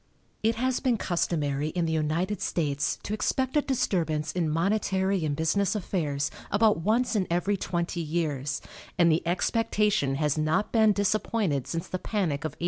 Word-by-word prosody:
It 225 +1 +2
has 255 +2 0
been 250 -4 +1
customary 150 -6 -1
in 170 +2 -1
the 160 - -1
United 165 +6 -1
States 145 -4 -1
to 210 - -4
expect 260 +5 -1
a 295 - +5
disturbance 165 - 0
in 165 -1 -1
monetary 190 +2 +1
and 150 -2 0
business 185 +7 +1
affairs 150 -8 -1 0.2
about 210 +1 +3
once 230 +6 +1
in 195 -3 +1
every 180 +4 +1
twenty 170 -2 -2
years, 150 -4 -2 0.3
and 170 -2 +5
the 160 - +2
expectation 210 - +1
has 150 +1 0
not 160 +7 +1
been 220 -2 +5
disappointed 200 - 0
since 165 -1 -3
the 185 - -4
panic 175 -10 -1
of 155 -4 -3
1837. - - -22
175 Hz, 165 wpm, -27 LUFS, 155-210 Hz, 0.3 s, a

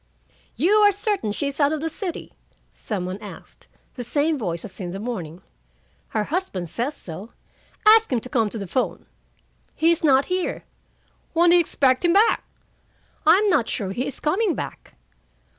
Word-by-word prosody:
"You 330 - +2
are 415 -1 +6
certain 400 - -1
she 250 - -3
is 280 +1 -3
out 285 0 +4
of 310 - -1
the 325 - -2
city?" 345 +2 -6 0.4
some 195 -5 -4
one 185 +2 -5
asked, 210 - -12 0.3
the 245 - -6
same 295 +6 +1
voice 175 - -4
as 210 - -10
in 180 -3 -4
the 190 +2 -6
morning. 190 -7 -6 0.6
"Her 215 - -1
husband 210 - -3
says 265 - -3
so." 185 +7 -9 0.5
"Ask 445 -2 +7
him 250 - +2
to - - -8
come 230 -4 +1
to 225 - -6
the 200 - -5
phone." 250 +8 -2 0.7
"He 325 +2 +3
is 335 - 0
not 275 -3 +4
here." 365 0 -2 0.7
"When 340 +1 +5
do - - +7
you - - +7
expect 270 -5 +2
him 345 -1 +4
back?" 420 +4 +4 0.8
"I'm 420 +3 +6
not 260 -9 +2
sure 195 -3 -2
he 245 +6 -2
is 280 - -5
coming 370 +4 +1
back." - - -7
275 Hz, 180 wpm, -23 LUFS, 210-345 Hz, 0.8 s, Ask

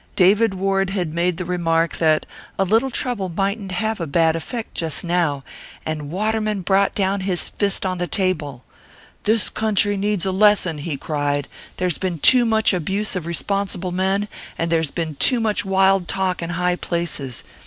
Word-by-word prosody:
David 200 +2 +4
Ward 195 0 0
had 180 -5 -2
made 170 0 0
the 180 - -4
remark 165 -2 0
that 155 -2 +2 0.3
'A - - +3
little 225 +7 +2
trouble 235 -7 -2
mightn't 195 +2 -2
have 220 +3 -1
a 165 - -2
bad 160 +2 +2
effect 220 +8 -5
just 160 -3 -1
now.' 170 -6 0 0.4
And 155 -2 -4
Waterman 215 +2 -1
brought 195 +2 +2
down 195 0 0
his 185 -2 0
fist 200 -1 -1
on 185 -1 -2
the 175 - -1
table. 155 -9 -2 0.6
'This 220 0 +1
country 205 -1 +1
needs 200 -2 -1
a 190 - 0
lesson,' 190 -5 +3
he 145 -1 -4
cried. 145 -1 -1 0.3
'There's 180 -3 -1
been 185 -3 -2
too 245 - +6
much 220 -2 +3
abuse 195 +5 -1
of 175 -3 -4
responsible 190 +1 -2
men, 190 +3 0 0.3
and 165 0 -1
there's 160 -2 +2
been 160 -3 -4
too 250 - +4
much 220 -2 0
wild 195 -1 +3
talk 190 -3 -1
in 170 - -4
high 180 +1 0
places. 155 -9 -3
185 Hz, 175 wpm, -21 LUFS, 165-200 Hz, 0.6 s, too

